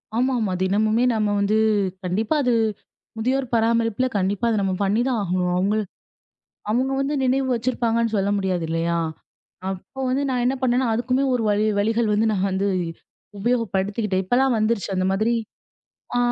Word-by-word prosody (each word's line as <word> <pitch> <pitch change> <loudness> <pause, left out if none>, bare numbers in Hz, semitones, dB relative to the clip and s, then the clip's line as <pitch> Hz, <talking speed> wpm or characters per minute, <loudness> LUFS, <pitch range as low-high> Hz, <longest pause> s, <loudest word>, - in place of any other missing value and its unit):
ஆமாமா. 240 -4 +1
தினமுமே 215 +4 +2
நம்ம 215 -2 0
வந்து, 205 +2 +2 0.5
கண்டிப்பா 210 - 0
அது 250 -2 +2 0.6
முதியோர் 260 +4 0
பராமரிப்புல 230 +1 +2
கண்டிப்பா 200 +4 0
அத 225 - +1
நம்ம 195 -1 0
பண்ணிதான் 230 +5 +1
ஆகணும். 180 -1 0
அவங்களு 205 +4 +1 0.9
அவங்க 255 +4 +1
வந்து 275 +2 -1
நினைவு 265 +1 +1
வச்சிருப்பாங்கன்னு 230 -1 0
சொல்ல 200 0 +1
முடியாது 185 -3 -1
இல்லையா? 165 +1 0 0.7
அப்போ 195 +8 -8
வந்து 260 +2 0
நான் 250 -2 0
என்ன 255 - +2
பண்ணேன்னா, 250 0 +2
அதுக்குமே 255 +3 0
ஒரு 235 - 0
வழி 210 +1 +2
வழிகள் 225 +2 +1
வந்து 215 +2 +2
நான் 195 -1 0
வந்து 190 +1 0 0.7
உபயோகப்படுத்திக்கிட்டேன். 205 -3 0
இப்பல்லாம் 250 +5 +2
வந்துருச்சு 215 -2 0
அந்த 185 - +1
மாதிரி. 220 +5 +1 0.8
ஆ - - +3
220 Hz, 145 wpm, -23 LUFS, 195-245 Hz, 0.9 s, ஆ